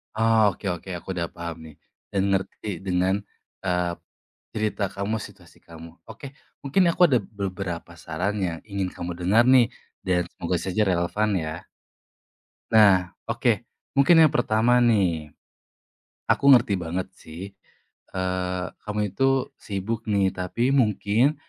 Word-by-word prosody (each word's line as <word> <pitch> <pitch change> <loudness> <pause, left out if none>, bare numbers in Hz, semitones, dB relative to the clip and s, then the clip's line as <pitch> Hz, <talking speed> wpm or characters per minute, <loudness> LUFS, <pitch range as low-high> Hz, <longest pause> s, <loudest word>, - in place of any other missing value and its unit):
Oh, 110 -2 +4
oke 95 - -13
oke, 90 +1 -5
aku 85 - -13
udah 85 - 0
paham 85 -1 -5
nih, 80 -2 -13 0.4
dan 100 - +2
ngerti 95 0 -2
dengan, 90 0 +1 0.5
eee, 90 -1 +1 0.6
cerita 110 -1 -1
kamu 100 +3 -2
situasi 90 -4 -19
kamu. 85 0 -11 0.2
Oke, - - -10 0.4
mungkin 140 +7 +2
aku 170 - -2
ada 130 - +4 0.2
beberapa 95 -3 -4
saran 90 +6 -2
yang 85 -1 -5
ingin 100 -2 -2
kamu 85 0 -5
dengar 105 +7 +4
nih, 125 -3 +6 0.4
dan 90 -1 +2
semoga 85 +1 -2
saja 95 +3 0
relevan, 90 +4 0
ya. 80 +1 -6 1.1
Nah, 100 -5 +5 0.2
oke - - 0 0.3
mungkin 160 +4 +7
yang 155 - +5
pertama 120 +1 +3
nih. 90 -11 +1 1.0
Aku 140 - +2
ngerti 120 -6 +6
banget 90 +2 -3
sih, 95 +2 -10 0.6
eee, 90 0 -2 0.2
kamu 105 -1 -1
itu 135 0 +1
sibuk 110 +3 -4
nih, 100 -3 +2
tapi 95 +8 -1
mungkin, 115 +2 +2
95 Hz, 135 wpm, -25 LUFS, 90-110 Hz, 1.1 s, mungkin